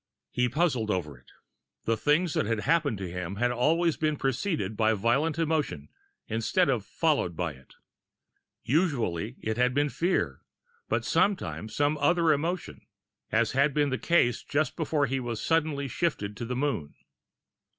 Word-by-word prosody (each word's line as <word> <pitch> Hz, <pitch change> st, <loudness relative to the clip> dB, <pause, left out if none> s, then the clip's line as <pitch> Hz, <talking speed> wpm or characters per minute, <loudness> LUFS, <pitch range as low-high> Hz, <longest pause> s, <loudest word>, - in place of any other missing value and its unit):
He 125 Hz, 0 st, +1 dB
puzzled 135 Hz, -8 st, +1 dB
over 85 Hz, -8 st, -2 dB
it. 65 Hz, -, -21 dB, 0.6 s
The 115 Hz, -, +2 dB
things 150 Hz, -, +2 dB
that -, -, 0 dB
had 115 Hz, -2 st, 0 dB
happened 150 Hz, -6 st, +1 dB
to 95 Hz, -2 st, -5 dB
him 90 Hz, +1 st, -4 dB
had 120 Hz, +4 st, +1 dB
always 160 Hz, +7 st, +2 dB
been 155 Hz, -1 st, +1 dB
preceded 135 Hz, -, -1 dB
by 110 Hz, +1 st, +3 dB
violent 135 Hz, +10 st, +1 dB
emotion, 155 Hz, -, -1 dB, 0.4 s
instead 115 Hz, +10 st, +1 dB
of 120 Hz, -6 st, +1 dB
followed 140 Hz, -, 0 dB
by 85 Hz, -2 st, -2 dB
it. 65 Hz, 0 st, -19 dB, 0.9 s
Usually, 120 Hz, -, 0 dB
it 110 Hz, +1 st, -2 dB
had 125 Hz, +1 st, +2 dB
been 145 Hz, +1 st, +2 dB
fear 175 Hz, +6 st, -1 dB, 0.5 s
but -, -, 0 dB
sometimes 185 Hz, -, 0 dB
some 145 Hz, +1 st, +1 dB
other 165 Hz, +2 st, +4 dB
emotion, 165 Hz, +5 st, -3 dB, 0.5 s
as 110 Hz, 0 st, +2 dB
had 140 Hz, +1 st, +2 dB
been 145 Hz, -2 st, +2 dB
the 130 Hz, -, -1 dB
case 170 Hz, -9 st, +2 dB
just 155 Hz, +2 st, -1 dB
before 155 Hz, -3 st, +1 dB
he 135 Hz, 0 st, -1 dB
was 120 Hz, -3 st, -4 dB
suddenly 155 Hz, -4 st, 0 dB
shifted 120 Hz, -, -2 dB
to 120 Hz, -, -4 dB
the 125 Hz, +2 st, -3 dB
Moon. 120 Hz, -, -2 dB
135 Hz, 160 wpm, -28 LUFS, 110-155 Hz, 0.9 s, other